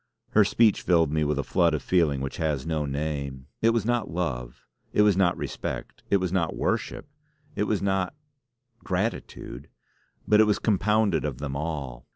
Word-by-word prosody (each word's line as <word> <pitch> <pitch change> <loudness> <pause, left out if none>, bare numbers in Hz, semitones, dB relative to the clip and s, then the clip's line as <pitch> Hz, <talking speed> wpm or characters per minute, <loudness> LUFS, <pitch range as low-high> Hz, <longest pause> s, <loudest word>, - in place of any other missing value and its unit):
Her 105 - +6
speech 110 +1 +3
filled 85 -4 +3
me 75 0 +1
with 75 -1 0
a 70 - 0
flood - - +2
of - - -4
feeling 80 -7 +2
which 70 - -4
has 75 -5 -1
no 80 -3 -1
name. 70 -2 -3 0.2
It 115 - +5
was 115 -2 +1
not 120 -1 0
love; 65 -9 -4 0.3
it 105 - +5
was 105 -3 +4
not 90 -2 +2
respect; - - -5
it 100 - +4
was 95 -2 -2
not 85 -4 0
worship; - - -2 0.5
it 105 - 0
was 105 -2 -1
not, 95 +4 0 0.7
gratitude. 90 - -3 0.6
But 105 - +5
it - - +6
was 105 -1 +2
compounded 105 -3 +2
of 75 -5 -3
them 70 0 -4
all. 70 -5 -4
85 Hz, 180 wpm, -26 LUFS, 70-100 Hz, 0.7 s, Her